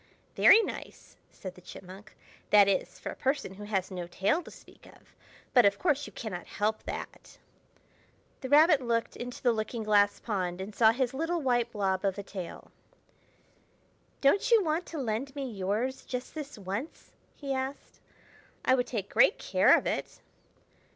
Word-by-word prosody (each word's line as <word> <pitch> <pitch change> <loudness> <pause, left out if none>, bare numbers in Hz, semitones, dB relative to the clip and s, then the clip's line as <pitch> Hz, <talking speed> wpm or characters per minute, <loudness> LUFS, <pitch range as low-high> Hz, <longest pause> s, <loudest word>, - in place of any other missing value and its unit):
"Very 450 - +7
nice!" - - -8
said 185 -2 -9
the 180 - -16
Chipmunk; 190 +3 -12 0.3
"that 205 -1 +7
is, 195 - -1
for - - -6
a - - -9
person 270 -7 -1
who 205 +2 -9
has 195 -2 -2
no 180 -2 -5
tail 200 - 0
to - - -12
speak - - -17
of. - - -20 0.4
But, 245 - +7
of 200 -1 +3
course, 290 -5 0
you - - -12
cannot 195 -7 -6
help 215 +1 -1
that." - - -8 1.0
The 260 - -6
Rabbit 305 0 +6
looked 230 -2 -1
into 245 0 -7
the 245 - +4
looking 220 +1 -3
glass 205 -1 +3
pond 185 -5 -3
and 195 +3 -6
saw 220 +1 +5
his 250 +1 -1
little 330 +5 -1
white 245 -4 +1
blob 195 -3 -1
of 195 -1 0
a 200 - -5
tail. 185 -3 -8 1.5
"Don't 285 +9 +3
you 460 -4 +5
want 325 +2 -1
to 330 - -7
lend 265 +2 -3
me 275 -2 -3
yours, 220 +5 -2
just 250 0 -6
this 295 -5 -7
once?" 205 - -6 0.2
he 275 -2 -4
asked. 265 +1 -5 0.7
"I - - +4
would 250 -1 +1
take 210 -6 -3
great 240 - +4
care - - +4
of - - -4
it!" - - -3
230 Hz, 170 wpm, -29 LUFS, 200-270 Hz, 1.5 s, Very